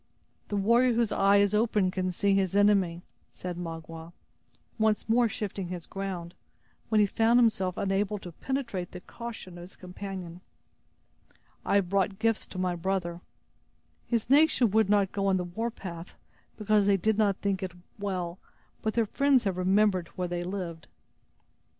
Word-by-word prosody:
The 205 - -2
warrior 235 +5 +4
whose 230 -2 +1
eye 200 +1 +4
is 200 0 +3
open 210 -3 +2
can 185 -1 -1
see 200 +3 +1
his 195 -1 +1
enemy," 195 -4 +3 0.3
said 180 -1 -6
Magua, 165 -1 -7 0.7
once 220 -1 +1
more 230 +1 +3
shifting 200 -3 -4
his 175 -2 -6
ground, 185 -3 -5 0.6
when 220 - +3
he 210 - +6
found 225 +4 +3
himself 190 -6 +2
unable 200 +1 0
to 180 -3 -9
penetrate 235 - -4
the 180 - -6
caution 225 -7 -8
of - - -9
his 180 +2 -11
companion. 180 -1 -8 1.2
"I - - +1
have 195 -3 +2
brought 195 0 +1
gifts 225 0 0
to - - -10
my 185 -1 0
brother. 175 -1 -2 0.9
His 235 -3 0
nation 275 -4 +4
would 220 -1 +3
not 200 -2 +3
go 195 -1 -1
on 190 -1 +3
the 180 - -1
warpath, 180 -3 -6 0.4
because 210 -1 +2
they 200 -1 +4
did 215 +3 +1
not 200 -3 +3
think 200 -1 -1
it 185 -2 -4 0.3
well, 185 -3 -3 0.4
but 220 - -2
their 230 -1 +3
friends 275 +3 +3
have 195 -4 -1
remembered 185 -1 +2
where 180 -1 -2
they 175 0 -3
lived." 175 -3 -5
195 Hz, 160 wpm, -28 LUFS, 180-215 Hz, 1.2 s, he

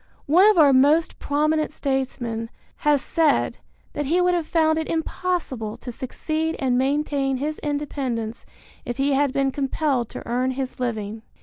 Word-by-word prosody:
One 355 +8 +6
of 430 - +3
our 290 -4 +7
most 290 +5 +3
prominent 305 +2 +1
statesmen 250 -5 -2 0.3
has 295 -2 +2
said 320 -3 +1 0.3
that 290 -1 -2
he 340 +5 +2
would 360 0 +3
have 340 -3 -1
found 315 -1 +2
it 320 - -3
impossible 320 -9 -2
to 245 - -7
succeed 310 +6 -3
and 260 -3 +1
maintain 275 0 0
his 300 +3 -3
independence 270 -6 -3 0.4
if 240 - -5
he 275 +1 +2
had 280 0 +2
been 275 0 +1
compelled 270 -3 -1
to - - -8
earn 250 +2 0
his 260 -2 -4
living. 220 -3 -3
280 Hz, 160 wpm, -23 LUFS, 255-310 Hz, 0.4 s, our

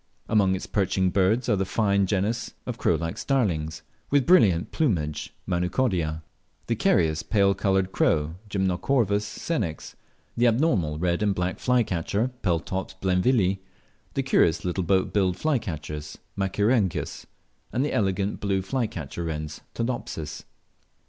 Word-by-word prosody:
Among 100 -4 +3
its 95 - -5
perching 95 -2 +1
birds 100 +6 +2
are 110 - +3
the 95 - 0
fine 100 0 +1
genus 105 +4 -1
of - - -5
crow - - +3
like 85 0 -3
starlings, 85 - 0 0.3
with 140 -2 +3
brilliant 100 - +4
plumage 85 - -1
(Manucodia); 90 -3 0 0.4
the - - 0
carious 80 -2 +2
pale 100 -2 +3
coloured 95 -1 +1
crow 75 -3 +1 0.2
(Gymnocorvus 100 +3 +1
senex); 105 - -3 0.4
the 120 +1 +3
abnormal 110 - +2
red 85 +2 0
and 105 -2 +2
black 90 +1 -2
flycatcher 115 -1 +1
(Peltops 95 +1 -2
blainvillii); 95 +1 +2 0.6
the 135 - +1
curious 85 -11 +2
little 90 +1 -1
boat 95 +2 +1
billed 95 -3 +2
flycatchers 75 - -3 0.2
(Machaerirhynchus); 100 +1 0 0.4
and 130 +4 +1
the - - -2
elegant 100 0 0
blue 95 -2 0
flycatcher 95 - -3
wrens 75 -1 -4
(Todopsis). 100 -11 -4
95 Hz, 130 wpm, -26 LUFS, 85-110 Hz, 0.6 s, brilliant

